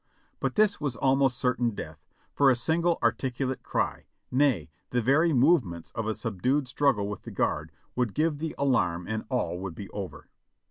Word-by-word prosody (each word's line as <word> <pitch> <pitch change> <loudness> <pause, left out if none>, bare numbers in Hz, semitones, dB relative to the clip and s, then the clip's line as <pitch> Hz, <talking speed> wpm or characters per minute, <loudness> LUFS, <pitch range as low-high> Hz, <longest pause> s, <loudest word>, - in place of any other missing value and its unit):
But - - -1
this 210 -3 +3
was 145 -5 -1
almost 135 0 +2
certain 120 -3 0
death, 80 -4 -8 0.3
for 140 -1 +5
a 130 - +5
single 165 +8 +1
articulate 130 +2 0
cry, - - -2 0.3
nay, 125 - +2 0.2
the 125 - +1
very 140 +8 +3
movements 125 - +2
of 115 -1 -3
a 110 - 0
subdued 125 +6 0
struggle 125 -6 +1
with 105 -2 -5
the - - -9
guard - - -1 0.2
would 125 -5 0
give 155 -1 +1
the 160 0 -3
alarm 90 -11 +1
and 110 0 -3
all 125 -8 -1
would 95 -3 -5
be 100 +2 -8
over. 100 -3 -7
125 Hz, 175 wpm, -28 LUFS, 105-140 Hz, 0.3 s, for